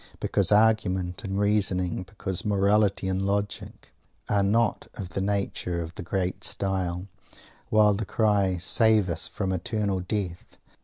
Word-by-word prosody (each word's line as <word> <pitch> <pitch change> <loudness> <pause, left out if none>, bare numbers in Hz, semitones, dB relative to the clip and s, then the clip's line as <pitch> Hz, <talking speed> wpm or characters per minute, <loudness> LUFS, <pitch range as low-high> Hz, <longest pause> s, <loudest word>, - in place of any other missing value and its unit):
Because 100 -2 0
arguments 105 -4 +2
and 95 -1 -3
reasoning; 95 -4 +1
because 95 -1 -1
morality 100 -1 +2
and 95 0 -1
logic, 100 +1 -3 0.3
are 100 - +2
not 105 +3 +1
of 95 -3 -6
the 95 - -3
nature 100 -3 -2
of 85 0 -6
the 105 - -7
"great 90 0 -3
style," 95 -2 -1 0.6
while 105 -1 +4
the 105 +3 -2
cry 100 -3 +1
"save 105 +2 +4
us 80 -1 -2
from 95 -2 -3
eternal 100 +1 -1
death!" 90 -2 -5
100 Hz, 140 wpm, -26 LUFS, 90-105 Hz, 0.6 s, while